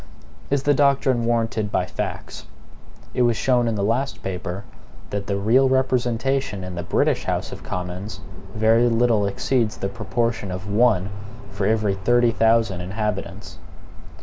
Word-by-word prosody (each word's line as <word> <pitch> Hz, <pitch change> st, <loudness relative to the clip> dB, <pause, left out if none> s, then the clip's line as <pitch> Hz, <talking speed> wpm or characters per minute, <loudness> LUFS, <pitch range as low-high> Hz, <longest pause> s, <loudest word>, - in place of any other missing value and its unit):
Is 140 Hz, -1 st, +1 dB
the 145 Hz, -, +4 dB
doctrine 135 Hz, -4 st, +2 dB
warranted 115 Hz, -3 st, 0 dB
by -, -, +1 dB
FACTS? -, -, -6 dB, 0.7 s
It -, -, 0 dB
was 120 Hz, -2 st, +3 dB
shown 125 Hz, -2 st, +2 dB
in 115 Hz, -, 0 dB
the 100 Hz, -, -1 dB
last 115 Hz, +1 st, -1 dB
paper, 95 Hz, 0 st, -4 dB, 0.5 s
that 100 Hz, -1 st, -3 dB
the 100 Hz, -, 0 dB
real 120 Hz, +7 st, +4 dB
representation 130 Hz, -3 st, 0 dB
in 90 Hz, 0 st, -6 dB
the 85 Hz, -, -4 dB
British -, -, 0 dB
House -, -, -2 dB
of -, -, -8 dB
Commons 90 Hz, +3 st, -5 dB, 0.4 s
very 115 Hz, +2 st, +4 dB
little 115 Hz, -3 st, +2 dB
exceeds 115 Hz, +2 st, 0 dB
the 100 Hz, -, -3 dB
proportion 115 Hz, 0 st, -2 dB
of 90 Hz, +2 st, -5 dB
one 105 Hz, -3 st, +2 dB, 0.4 s
for 100 Hz, 0 st, -1 dB
every 110 Hz, -2 st, +2 dB
thirty 120 Hz, +5 st, +3 dB
thousand 115 Hz, -5 st, +2 dB
inhabitants. 100 Hz, -1 st, -4 dB
110 Hz, 150 wpm, -22 LUFS, 100-120 Hz, 0.7 s, the